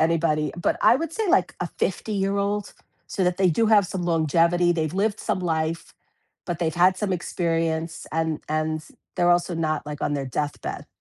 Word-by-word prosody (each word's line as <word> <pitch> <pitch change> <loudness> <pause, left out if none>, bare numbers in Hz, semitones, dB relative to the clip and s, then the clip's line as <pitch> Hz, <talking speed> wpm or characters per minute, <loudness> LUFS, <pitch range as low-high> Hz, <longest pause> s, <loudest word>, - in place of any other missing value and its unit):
anybody, 160 -2 +1
but 175 - 0
I - - +7
would 330 +2 -4
say, 440 +5 -1
like, 370 - +3
a - - -2
fifty-year-old, 200 0 -1 0.3
so 190 - -1
that 180 0 0
they 190 -1 +4
do 225 +8 +2
have 210 -3 +5
some 180 +1 -4
longevity, 170 +1 +3
they've 160 -1 -2
lived 205 +2 0
some - - -1
life, 165 -1 -2 0.5
but 175 -2 -3
they've 160 -2 0
had 180 +2 +4
some 195 0 -1
experience, 165 -2 -2
and 160 -1 -1
and 155 0 -1 0.3
they're 175 0 +3
also 175 0 +2
not, 155 -2 -1
like, 150 -1 -6
on 145 - 0
their 140 -1 -2
deathbed. 145 +3 -4
170 Hz, 180 wpm, -24 LUFS, 160-190 Hz, 0.5 s, I